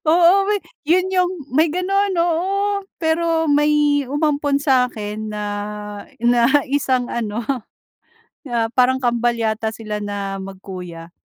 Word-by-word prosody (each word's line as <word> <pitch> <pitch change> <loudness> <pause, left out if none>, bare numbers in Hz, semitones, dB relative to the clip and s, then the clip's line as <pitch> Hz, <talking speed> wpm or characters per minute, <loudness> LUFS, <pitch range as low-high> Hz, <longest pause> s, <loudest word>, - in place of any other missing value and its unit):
Oo 355 +4 +5
may 420 -1 +2 0.3
'yon 370 +3 +3
'yong, 365 0 +2 0.2
may 315 +4 +4
gano'n, 380 +3 0
oo. 385 +4 +1 0.2
Pero 325 0 +1
may 295 -1 +3
umampon 290 -1 +1
sa'kin 230 -6 0
na, 210 0 -4 0.8
na 240 0 +4 0.2
isang 260 -2 0
ano, 230 -1 -3 1.0
ah, 230 -2 -1
parang 255 +1 +2
kambal 240 0 +1
yata 220 -1 -1
sila 215 -2 -5
na 200 -1 -4
magkuya. 180 -3 -8
265 Hz, 115 wpm, -20 LUFS, 220-335 Hz, 1.0 s, Oo